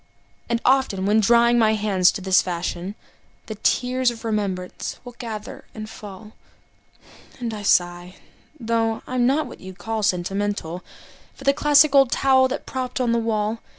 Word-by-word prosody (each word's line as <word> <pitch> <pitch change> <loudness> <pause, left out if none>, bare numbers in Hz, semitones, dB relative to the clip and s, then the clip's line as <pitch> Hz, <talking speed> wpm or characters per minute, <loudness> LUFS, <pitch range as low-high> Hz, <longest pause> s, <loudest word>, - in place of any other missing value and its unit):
And 235 -1 +1
often, 255 -8 +2
when 210 +2 +3
drying 235 +2 +4
my 220 -1 +3
hands 200 -4 +3
in 195 - -10
this 190 -1 +4
fashion, 175 +2 -4 0.5
The 220 - -6
tears 250 +4 +1
of 235 -1 -8
remembrance 200 -4 -3
will 245 - -8
gather 220 -3 -7
and 215 -1 -6
fall, 210 -1 -11 1.1
And 235 -2 -4
I 210 - -6
sigh 175 -2 +1 0.4
(though 225 -1 -1
I'm 250 -1 0
not 290 +4 +1
what 250 - -11
you'd 185 0 -10
call 225 0 -3
sentimental) 190 -2 -2 0.5
For - - -13
the 275 - +4
classic 295 0 +4
old 270 -3 +5
towel 260 -1 +4
that 260 - -5
propped 255 0 -4
up 245 -2 +1
the 235 - +2
wall. 220 -1 -1
220 Hz, 160 wpm, -22 LUFS, 195-245 Hz, 1.1 s, old